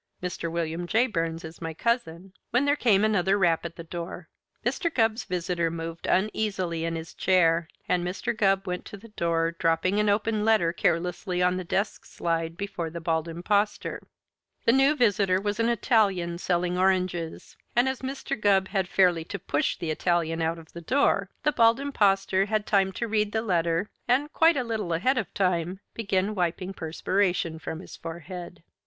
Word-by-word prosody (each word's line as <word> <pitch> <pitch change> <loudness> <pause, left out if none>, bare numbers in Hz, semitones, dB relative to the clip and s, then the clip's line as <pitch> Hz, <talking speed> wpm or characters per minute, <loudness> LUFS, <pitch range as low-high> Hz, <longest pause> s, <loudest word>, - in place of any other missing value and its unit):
Mr. 175 -2 -3
William 170 +1 -2
J. 225 +7 +3
Burns 165 -6 -2
is 160 +1 -10
my 165 -1 -4
cousin 190 -5 -2
" - - -54
when 250 +4 +2
there 285 0 +3
came 215 -7 +3
another 200 -2 +2
rap 175 -4 +2
at 170 - -6
the 170 - -8
door. 170 +1 -7 0.4
Mr. 340 -3 0
Gubb's 225 -4 +1
visitor 175 -2 -1
moved 165 0 -6
uneasily 190 -4 0
in 165 0 -2
his 160 0 -7
chair, 170 -3 +3 0.2
and 180 -1 +1
Mr. 180 +6 -2
Gubb 195 -2 +2
went 180 -1 -3
to 205 - -9
the 230 +4 -14
door, 165 -4 0
dropping 170 +4 +1
an 210 0 +2
open 210 +1 +1
letter 210 -7 +3
carelessly 180 +1 0
on 180 0 +3
the 185 - -3
desk 195 +4 -2
slide 165 -1 -2
before 185 -4 -4
the 170 +1 -6
Bald 160 0 -1
Impostor. 200 +5 -1 0.6
The - - +6
new 270 +4 +4
visitor 200 -7 +3
was 205 +2 -2
an 230 +1 +2
Italian 195 -7 +1
selling 180 0 0
oranges, 185 -3 0 0.2
and 240 +2 +4
as 265 -1 -2
Mr. 265 +1 -3
Gubb 195 -3 +2
had 190 -3 0
fairly 180 -3 +3
to 200 - -5
push 145 -5 -1
the 165 -2 -3
Italian 165 0 0
out 165 +1 0
of 165 -1 -14
the 170 - -8
door, 200 - +2
the 300 - +3
Bald 230 -2 +4
Impostor 195 -8 +2
had 215 0 -1
time 195 -2 +2
to 235 - -3
read 210 -1 0
the 220 0 0
letter 170 -1 0 0.2
and, 275 +5 +1
quite 325 -1 +5
a 255 - +1
little 220 -7 -2
ahead 255 +11 +2
of 205 - -4
time, 180 -1 0
began 200 -2 0
wiping 180 0 -2
perspiration 175 0 -1
from 160 +1 -6
his - - -11
forehead. 170 +1 -8
185 Hz, 185 wpm, -27 LUFS, 170-215 Hz, 0.6 s, The